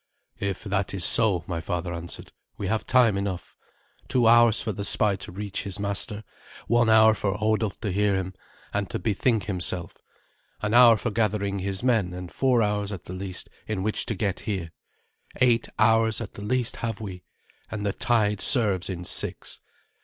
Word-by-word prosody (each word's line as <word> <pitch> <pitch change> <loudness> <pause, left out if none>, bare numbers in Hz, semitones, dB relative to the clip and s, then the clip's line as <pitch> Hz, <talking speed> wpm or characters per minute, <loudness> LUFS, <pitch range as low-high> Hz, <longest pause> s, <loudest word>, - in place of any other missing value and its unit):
"If 100 -2 -3
that 100 -1 -2
is 90 - +4
so," 95 -7 +6
my 85 -2 -4
father 85 +1 -4
answered, 85 0 -6 0.3
"we 100 - -5
have 110 +3 -2
time 120 -6 +3
enough. 95 -3 -5 0.5
Two 125 -2 +1
hours 120 -1 +5
for 110 - -2
the 100 0 -5
spy 100 0 +2
to 95 - -8
reach 100 +1 -4
his 100 -3 -4
master; 100 +1 -2 0.4
one 120 0 +2
hour 110 0 +6
for 105 -1 -2
Hodulf 110 -1 -1
to 105 -4 -2
hear 100 +1 +1
him, 95 0 -3 0.4
and - - -2
to - - -3
bethink 110 +1 0
himself; 90 -3 -2 0.7
an 105 0 -1
hour 120 -2 +7
for 115 +2 -3
gathering 105 -2 -1
his 95 +2 -3
men; 110 -8 +1
and 90 -1 -8
four 125 -4 +2
hours, 105 -1 -1
at 95 -4 -8
the 90 - -8
least, 95 0 -5 0.2
in 105 -3 -3
which 110 +1 0
to 115 - -2
get 100 -1 -2
here. 95 -6 -4 0.7
Eight 120 -2 +3
hours, 110 0 +3
at 115 -4 -7
the - - -10
least, 120 +3 -1
have 115 -3 -4
we, 95 -4 -8 0.5
and 105 -1 -5
the 100 - 0
tide 105 -4 +1
serves 105 - +2
in 90 -2 -5
six. - - -1
105 Hz, 185 wpm, -25 LUFS, 95-110 Hz, 0.7 s, hour